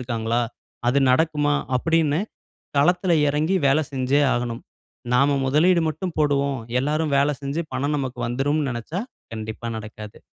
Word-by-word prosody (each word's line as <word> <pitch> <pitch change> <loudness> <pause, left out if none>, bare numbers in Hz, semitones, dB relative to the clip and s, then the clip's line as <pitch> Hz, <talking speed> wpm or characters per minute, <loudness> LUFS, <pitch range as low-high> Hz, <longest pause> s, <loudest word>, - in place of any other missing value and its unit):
இருக்காங்களா? 115 -1 -1 0.5
அது 140 - +2
நடக்குமா? 150 +1 +2 0.2
அப்பிடீன்னு 160 +2 +1 0.6
களத்துல 180 +4 +3 0.2
இறங்கி 155 +6 +1
வேலை 145 +3 +3
செஞ்சே 135 +2 +1
ஆகணும்! 120 -1 -3 0.5
நாம 140 +2 +4
முதலீடு 165 +5 +4
மட்டும் 160 +3 -4
போடுவோம். 140 -2 +1 0.2
எல்லாரும் 150 +1 0
வேலை 145 +1 +2
செஞ்சு, 140 +5 -2
பணம் 145 +3 0
நமக்கு 130 -2 -4
வந்துரும்ன்னு 140 +3 0
நினைச்சா, 120 +10 -4 0.3
கண்டிப்பா 110 +1 -6
நடக்காது! 105 0 -10
140 Hz, 130 wpm, -23 LUFS, 125-155 Hz, 0.6 s, நாம